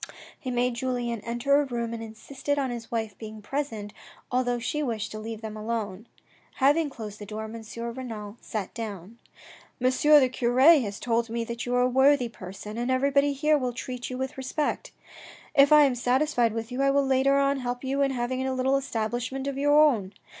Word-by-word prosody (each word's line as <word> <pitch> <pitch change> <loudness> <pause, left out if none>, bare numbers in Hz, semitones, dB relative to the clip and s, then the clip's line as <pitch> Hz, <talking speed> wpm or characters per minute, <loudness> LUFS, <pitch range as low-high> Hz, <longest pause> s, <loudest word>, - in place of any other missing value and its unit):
He 255 - -5
made 245 0 +1
Julien 240 -2 -2
enter 240 +6 +2
a - - -1
room 235 -3 -3
and 230 - -5
insisted 265 +6 -4
on 270 -3 0
his 235 -1 -7
wife 220 -3 -3
being 220 -1 -8
present, 215 -3 -4 0.4
although 245 -1 +1
she 245 +6 -2
wished 230 -7 -2
to 215 - -6
leave 220 0 -6
them 220 -1 -6
alone. 215 -1 -4 0.5
Having 290 +3 +3
closed 215 -6 -8
the 205 - -7
door 215 +1 -5
M. 225 +1 -7 0.3
Renal 225 -5 -7
sat 210 -4 -5
down. 215 -1 -7 0.3
" - - -23
M. 255 +1 +3
the 290 0 +5
cure 245 0 0
has 265 -9 +5
told 230 -1 0
me 230 +1 -2
that 235 +1 -5
you 245 - 0
are 250 - +3
a - - +4
worthy 265 0 +4
person, 210 +2 -8
and 240 +1 -1
everybody 280 +2 +2
here 300 +2 +2
will 250 -2 -2
treat 250 +1 -5
you 255 - -5
with 265 +1 -4
respect. 265 +3 -2 0.6
If 280 0 +6
I 300 -1 +8
am 275 -3 +3
satisfied 245 -1 +1
with 225 +1 -4
you 250 +2 -2
I 275 - +4
will 280 0 +3
later 270 +1 +3
on 275 0 +2
help 245 0 -4
you 270 +1 -1
in 275 - +3
having 255 0 -2
a 260 - -1
little 265 +1 +2
establishment 245 +1 -3
of 280 -1 -2
your 290 +1 +5
own. 225 -11 +3
245 Hz, 205 wpm, -27 LUFS, 225-275 Hz, 0.6 s, I